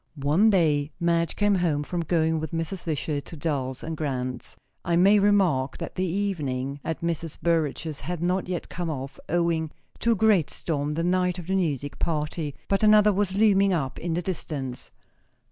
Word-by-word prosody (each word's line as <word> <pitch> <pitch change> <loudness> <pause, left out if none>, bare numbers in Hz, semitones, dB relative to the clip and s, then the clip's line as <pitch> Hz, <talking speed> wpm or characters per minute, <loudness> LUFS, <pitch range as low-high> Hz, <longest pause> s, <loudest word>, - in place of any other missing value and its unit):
One 150 +9 +3
day 155 -7 +2
Madge 170 -1 +1
came 205 0 +2
home 165 -6 +1
from 175 +3 -3
going 160 -1 +1
with 155 0 -5
Mrs. 165 +2 -3
Wishart 150 -2 -2
to 165 - -9
Dulles 135 -4 -2
& - - -3
Grant's. 130 -4 -3 0.3
I 170 - +1
may 195 +4 +6
remark 190 -10 +2
that 165 - -6
the 185 - -1
evening 145 -8 -2
at 160 - -3
Mrs. 165 -2 -3
Burrage's 160 -2 -1
had 175 0 -4
not 180 +2 0
yet 180 -2 -3
come 175 -1 -4
off, 135 -2 -5
owing 170 -1 +1 0.3
to 235 - +3
a - - 0
great 205 -7 +3
storm 150 -2 -2
the 165 - -1
night 180 0 +1
of 175 - -7
the 190 +2 -1
music 145 -6 -1
party; 150 -2 -2
but 195 - +1
another 210 -1 +6
was 195 -1 0
looming 200 -2 +4
up 135 -6 -2
in 170 -1 -2
the 175 - -1
distance. 140 -8 -4
165 Hz, 180 wpm, -26 LUFS, 150-185 Hz, 0.3 s, may